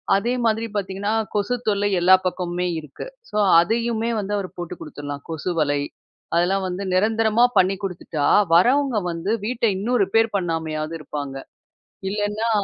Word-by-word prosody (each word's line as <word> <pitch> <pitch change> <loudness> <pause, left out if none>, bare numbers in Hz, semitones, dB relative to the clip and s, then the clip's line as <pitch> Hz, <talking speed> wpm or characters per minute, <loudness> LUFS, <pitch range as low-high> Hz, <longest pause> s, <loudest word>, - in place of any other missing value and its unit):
அதே 235 +5 0
மாதிரி 225 +1 +1
பார்த்தீங்கன்னா, 200 +1 -2 0.2
கொசு 210 +4 +1
தொல்லை 205 -1 +2
எல்லா 185 +2 +7
பக்கமுமே 180 0 -2
இருக்கு. 150 - -9 0.2
ஸோ - - -3 0.2
அதையுமே 230 +3 0
வந்து 205 0 -3
அவர் 190 -2 -4
போட்டு 175 0 -5
குடுத்தரலாம். 145 -2 -7
கொசு 165 +3 -3
வலை 145 -1 +1 0.5
அதெல்லாம் 185 +3 +2
வந்து 180 +2 -4
நிரந்தரமா 220 +3 +3
பண்ணி 190 +1 +4
குடுத்துட்டா, 170 -5 -3 0.3
வரவங்க 255 +7 +4
வந்து 170 +5 -3
வீட்டை 235 -1 0
இன்னும் 235 +4 0
ரிப்பேர் 225 +3 +2
பண்ணாமையாவது 160 -3 -3
இருப்பாங்க. 145 -2 -6 0.7
இல்லன்னா 210 +2 -1
195 Hz, 140 wpm, -22 LUFS, 170-220 Hz, 0.7 s, எல்லா